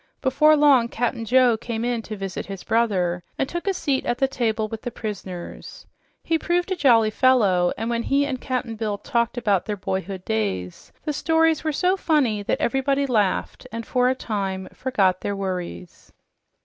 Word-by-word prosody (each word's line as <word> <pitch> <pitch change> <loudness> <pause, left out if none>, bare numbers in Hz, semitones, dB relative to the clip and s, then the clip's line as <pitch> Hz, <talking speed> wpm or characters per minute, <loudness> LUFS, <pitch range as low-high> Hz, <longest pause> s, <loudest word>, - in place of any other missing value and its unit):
Before 300 +3 +4
long, 280 -5 +5
Cap'n 235 -1 -2
Joe 250 -1 +4
came 230 0 -4
in 240 -1 -1
to 215 - -4
visit 195 -2 -5
his 195 -2 -7
brother 185 -7 +1 0.2
and 270 - 0
took 345 +5 -5
a 390 - +2
seat 275 -6 0
at 240 - -1
the 270 - +2
table 225 -4 -1
with 220 0 -7
the 245 - -4
prisoners. 200 -6 -7 0.4
He 325 -1 +1
proved 355 +3 0
a - - +2
jolly 230 -9 +4
fellow, 210 -9 +3
and 225 - -3
when 235 0 0
he 280 +4 +1
and 260 -3 -4
Cap'n 255 -3 -3
Bill 215 -2 -2
talked 235 +1 -1
about 205 -6 +1
their 210 -1 -2
boyhood 190 0 -4
days, 95 -5 -3
the 300 - -2
stories 320 +1 +2
were 315 - 0
so 360 +5 +2
funny 275 - +1
that 200 - -1
everybody 275 +2 +1
laughed 210 -8 0
and 230 0 -5
for 250 -1 +2
a 260 - +1
time 195 -6 -3
forgot 195 -8 +1
their 200 - -2
worries. 185 -2 -6
235 Hz, 185 wpm, -23 LUFS, 200-270 Hz, 0.4 s, long